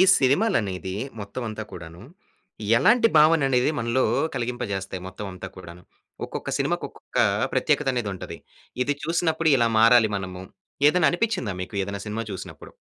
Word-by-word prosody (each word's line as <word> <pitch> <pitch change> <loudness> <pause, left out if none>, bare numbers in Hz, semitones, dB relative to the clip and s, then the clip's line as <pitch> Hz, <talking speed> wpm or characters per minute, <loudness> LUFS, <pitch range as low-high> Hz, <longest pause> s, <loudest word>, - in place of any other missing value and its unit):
ఈ - - +8 0.2
సినిమాలనేది 130 - +1 0.3
మొత్తం 100 +5 -6
అంతా 110 0 -5
కూడాను, 85 +1 -10 0.8
ఎలాంటి 230 - +5
భావననేది 145 -4 +4
మనలో 120 +3 +1 0.3
కలిగింపజేస్తాయి 100 -6 -4
మొత్తం 100 +2 -7
అంతా 90 +1 -8
కూడాను? 90 -1 -11 0.4
ఒక్కొక్క - - -6
సినిమాకొక్కొక్కా - - -1 0.3
ప్రత్యేకతనేదుంటది. 120 -9 -1 0.5
ఇది 145 +3 0
చూసినప్పుడు 165 -1 +1
ఇలా 120 -2 +3
మారాలి 115 -1 +6
మనము, 95 -1 -6 0.5
ఏదన్ననిపిచ్చిందా 175 - +1
మీకు 95 - -9
ఏదన్నా 100 +1 -5
సినిమా 110 +2 -3
చూసినప్పుడు? 95 - -9
115 Hz, 115 wpm, -24 LUFS, 95-145 Hz, 0.8 s, ఈ